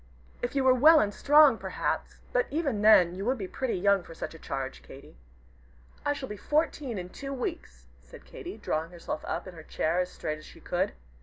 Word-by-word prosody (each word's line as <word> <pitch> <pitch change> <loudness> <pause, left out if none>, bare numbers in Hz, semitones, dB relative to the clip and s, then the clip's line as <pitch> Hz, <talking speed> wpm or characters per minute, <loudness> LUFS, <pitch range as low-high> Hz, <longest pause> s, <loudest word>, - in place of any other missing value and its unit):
If 245 +3 -3
you 275 - +2
were 260 -1 +6
well 305 +5 +7
and 205 -5 +1
strong, 290 -3 +6
perhaps - - -3
but - - +2
even 280 -9 -1
then 200 -5 +6
you 190 +2 -5
would 260 +3 +1
be 195 -4 -5
pretty 260 +5 -2
young 200 +1 +3
for 165 -1 -12
such - - -6
a 160 - -12
charge, 135 -2 -5
Katy." 135 - -14 0.9
"I 290 - +1
shall 275 -2 -6
be 210 - -7
fourteen 295 - -1
in 180 -1 -6
two 275 +8 -7
weeks," 60 - -5 0.2
said - - -15
Katy, - - -8
drawing 160 +1 -2
herself 170 -3 -6
up - - -3
in 185 - -9
her 165 - -10
chair 160 +2 -1
as 180 0 0
straight 155 0 -4
as 155 - -14
she - - -14
could. - - -1
205 Hz, 215 wpm, -28 LUFS, 170-275 Hz, 0.9 s, well